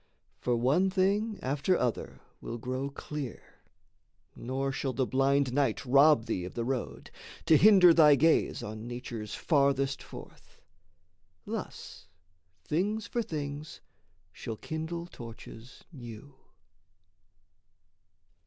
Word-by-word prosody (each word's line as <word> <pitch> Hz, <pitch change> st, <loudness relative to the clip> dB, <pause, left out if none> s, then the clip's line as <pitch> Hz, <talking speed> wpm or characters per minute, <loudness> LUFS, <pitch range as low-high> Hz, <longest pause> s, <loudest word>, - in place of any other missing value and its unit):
For 125 Hz, -, 0 dB
one 140 Hz, +11 st, +2 dB
thing 200 Hz, +3 st, +1 dB
after 145 Hz, +7 st, +1 dB
other 125 Hz, -2 st, -3 dB, 0.2 s
will 115 Hz, -, -5 dB
grow 130 Hz, +4 st, -4 dB
clear, 140 Hz, -2 st, -8 dB, 0.8 s
Nor 135 Hz, +2 st, -3 dB
shall 135 Hz, 0 st, -3 dB
the 130 Hz, +2 st, 0 dB
blind 135 Hz, 0 st, +1 dB
night 140 Hz, -3 st, 0 dB
rob 140 Hz, -1 st, +5 dB
thee 90 Hz, -, -2 dB
of 90 Hz, -, -8 dB
the 115 Hz, -, -2 dB
road, 130 Hz, -1 st, -4 dB, 0.3 s
To 160 Hz, -, +6 dB
hinder 185 Hz, 0 st, +7 dB
thy 150 Hz, -3 st, +7 dB
gaze 160 Hz, +4 st, +2 dB
on 110 Hz, +2 st, -7 dB
nature's 120 Hz, -3 st, -6 dB
Farthest 140 Hz, -3 st, +1 dB
forth. -, -, -13 dB, 0.9 s
Thus 80 Hz, -, -7 dB, 0.6 s
things 205 Hz, +7 st, -1 dB
for 240 Hz, -, -2 dB
things 150 Hz, -5 st, -6 dB, 0.5 s
shall 110 Hz, +3 st, -6 dB
kindle 160 Hz, +4 st, -5 dB
torches 115 Hz, -4 st, -12 dB
new. 120 Hz, +1 st, -10 dB
140 Hz, 110 wpm, -29 LUFS, 125-160 Hz, 0.9 s, hinder